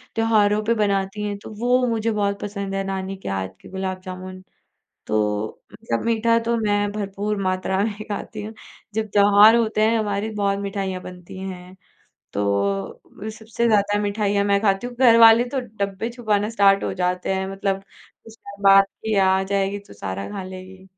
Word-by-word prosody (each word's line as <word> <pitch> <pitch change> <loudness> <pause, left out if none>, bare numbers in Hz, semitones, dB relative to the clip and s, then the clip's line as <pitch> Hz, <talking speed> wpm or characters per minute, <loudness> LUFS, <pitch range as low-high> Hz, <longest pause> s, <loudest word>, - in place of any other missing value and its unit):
त्योहारों 215 -2 +3
पे 230 - +3
बनाती 200 0 0
हैं 205 -1 -3
तो - - -8
वो 250 +2 +2
मुझे 230 -1 0
बहुत 200 -1 -1
पसंद 200 -1 -4
है 195 - -1
नानी 195 0 -4
के - - -2
हाथ 95 -1 -2
के - - -13
गुलाब 190 -1 -4
जामुन। 185 0 -8 0.7
तो 105 0 -1
मतलब 115 0 -3
मीठा 230 0 +2
तो 230 +1 -1
मैं 205 -2 0
भरपूर 205 0 -3
मात्रा 185 0 -1
में 215 0 -1 0.2
खाती 210 +1 -5
हूँ। 215 +1 -7 0.4
जब 220 +1 -1
त्योहार 205 +2 +7
होते 220 -2 +1
हैं 225 +1 +3
हमारी 210 0 -1
बहुत 200 -1 0
मिठाइयाँ 195 -2 -3
बनती 180 0 -10
हैं 185 -1 -8 0.6
तो 100 - -1 0.9
सबसे 220 +2 -3
ज़्यादा 205 -2 +3
मिठाइयाँ 205 -1 0
मैं 200 0 +3
खाती 200 +2 +1
हूँ। 245 - -10
घर 240 -2 +6
वाले 225 +1 +8
तो 275 - -1
डब्बे 210 -3 -4
छुपाना 215 -4 -1
स्टार्ट 200 -3 +4
हो - - -2
जाते 180 +1 -1
हैं। 190 0 -2
मतलब 195 0 -2 0.4
उसपे 205 -2 -13
बात 195 0 +7 0.2
की 220 -1 0
आ 190 0 +4
जाएगी 200 +1 -1
तो - - -13
सारा 100 -1 -5
खा 200 -2 -5
लेगी। 185 0 -10
200 Hz, 175 wpm, -22 LUFS, 190-215 Hz, 0.9 s, वाले